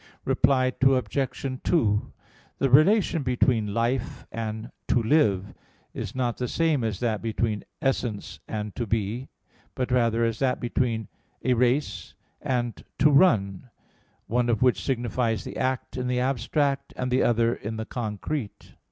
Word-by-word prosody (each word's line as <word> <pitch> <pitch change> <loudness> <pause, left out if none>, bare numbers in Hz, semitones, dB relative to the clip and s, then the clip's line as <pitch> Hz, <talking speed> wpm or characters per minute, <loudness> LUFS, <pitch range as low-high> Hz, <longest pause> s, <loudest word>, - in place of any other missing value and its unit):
Reply 130 -1 +3
Obj. 130 0 +1
2: 105 - +1 0.5
The 135 - +1
relation 170 - +5
between 125 -4 +1
"life" 115 +3 -1
and 110 +1 -5 0.2
"to 120 - +2
live" 105 -8 +2 0.4
is - - -5
not 125 -2 -1
the 125 - -2
same 160 -5 +1
as 110 -4 -2
that 110 -4 0
between 110 -1 -1 0.2
"essence" 120 -6 -2
and 105 -2 -4
"to 120 - -3
be"; 110 +5 -2 0.5
but 125 -1 -2
rather 115 -2 +2
as 115 -1 -2
that 130 -2 +1
between 120 -3 -1 0.4
"a 130 - +3
race" 120 - 0 0.3
and 120 -2 -2
"to 150 +2 +5
run," 120 - +3 0.6
one 120 +1 0
of 115 0 +2
which 120 -8 +3
signifies 120 -1 -1
the - - -7
act 130 0 -2
in 125 0 -2
the 125 0 0
abstract, 135 +2 0
and 125 0 -2
the 125 - +3
other 115 0 +3
in 110 0 -5
the 110 - -4
concrete. 110 +2 -5
120 Hz, 145 wpm, -26 LUFS, 110-130 Hz, 0.6 s, relation